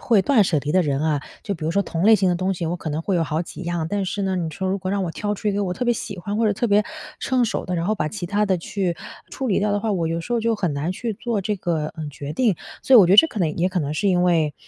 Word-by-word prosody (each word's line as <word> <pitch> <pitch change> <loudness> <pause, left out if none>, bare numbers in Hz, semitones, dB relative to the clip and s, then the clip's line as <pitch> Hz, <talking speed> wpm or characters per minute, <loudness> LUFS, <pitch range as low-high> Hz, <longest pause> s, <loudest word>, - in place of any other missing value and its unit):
会 220 -5 +3
断 235 -1 +4
舍 170 -5 +1
离 145 +2 -3
的 185 - +4
人 140 -4 0
啊。 155 -2 +1 0.2
就 200 - -3
比 155 -3 -5
如 - - +1
说 200 +4 +2
同 170 -2 -3
类 220 +1 +7
型 190 -2 +2
的 - - +1
东 185 +2 -1
西， 175 - -4
我 165 +2 -1
可 170 - -5
能 155 +2 -2
会 195 - -1
有 170 - +2
好 160 +1 -1
几 170 - -10
样。 170 -2 -2
但 205 +2 -1
是 200 +2 -2
呢， 190 -1 0
你 170 -2 -1
说 190 +5 -4
如 195 - -1
果 185 0 -4
让 200 -1 0
我 170 - -3
挑 205 +5 -2
出 210 +1 -2
一 - - +1
个 205 +1 0
我 180 -1 -2
特 250 - -3
别 240 - +3
喜 205 -3 -5
欢 205 +4 -3
或 230 - +3
者 210 - +3
特 225 +4 0
别 205 -1 +4 0.4
称 255 -2 +1
手 225 - -2
的， 180 - -2
然 165 - -1
后 215 +4 +1
把 155 -7 -1
其 190 +1 -6
它 205 +4 +1
的 190 -2 +2
去 180 0 -2 0.3
处 265 -2 -3
理 195 - +2
掉 210 +1 +1
的 205 0 0
话， 220 -1 -1
我 170 -4 0
有 165 +1 -1
时 205 - -5
候 235 - +2
就 230 0 +1
很 180 -7 -1
难 145 +4 -2
去 230 +3 -3
做 220 -1 -2
这 210 +2 -1
个， 165 -4 -2
嗯， 155 - -4
决 145 0 -7
定。 215 +1 +2 0.3
所 265 - +4
以 245 - +11
我 185 - +7
觉 185 - +3
得 - - +6
这 325 - +9
可 230 - -7
能 160 -5 0
也 180 +2 +2
可 185 - -2
能 145 0 -2
是 200 +6 0
因 180 -2 +3
为 165 -4 +2
185 Hz, 370 characters per minute, -22 LUFS, 165-210 Hz, 0.4 s, 以